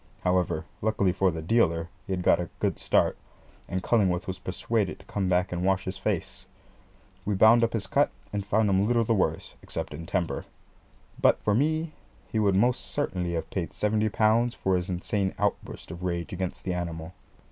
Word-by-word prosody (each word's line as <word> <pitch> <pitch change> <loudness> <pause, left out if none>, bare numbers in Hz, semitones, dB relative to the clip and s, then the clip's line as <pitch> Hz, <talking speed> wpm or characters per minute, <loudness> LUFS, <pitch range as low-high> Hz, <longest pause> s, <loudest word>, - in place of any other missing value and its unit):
However, 90 -3 +1 0.2
luckily 105 -3 +2
for 95 +1 +2
the 80 -2 -4
dealer, 85 -4 +2 0.2
he 95 - -1
had 90 -1 -2
got - - +4
a 90 - -3
good - - 0
start, - - +2 0.5
and 95 0 -2
Cullingworth 95 -5 +2
was 95 0 -5
persuaded 95 +2 -1
to - - -18
come 95 -2 -2
back 90 0 +2
and 90 0 -2
wash 95 0 +1
his 95 +1 -4
face. 100 -3 -3 0.8
We 105 0 -1
bound 110 +4 +6
up 115 - +1
his 110 -4 -1
cut, - - +2 0.2
and 100 -1 -1
found 105 +2 +2
him 100 +1 +3
little 120 0 +3
the 115 - +1
worse, 95 - 0
except - - -5
in 75 - -7
his 85 - -8
temper. 90 -3 -1 0.8
But - - +5
for 105 - +2
me 155 +6 +1 0.4
he 110 - 0
would 100 -3 +3
most 120 +5 +3
certainly 90 -12 -2
have 85 - -3
paid 90 -4 -3
seventy 105 +1 +1
pounds 115 +3 +2
for 95 -1 +1
his 90 +1 -1
insane 95 +2 -1
outburst - - -2
of 85 - -8
rage 85 -1 -3
against 90 0 -4
the 90 - -1
animal. 85 -1 -4
95 Hz, 195 wpm, -27 LUFS, 90-110 Hz, 0.8 s, bound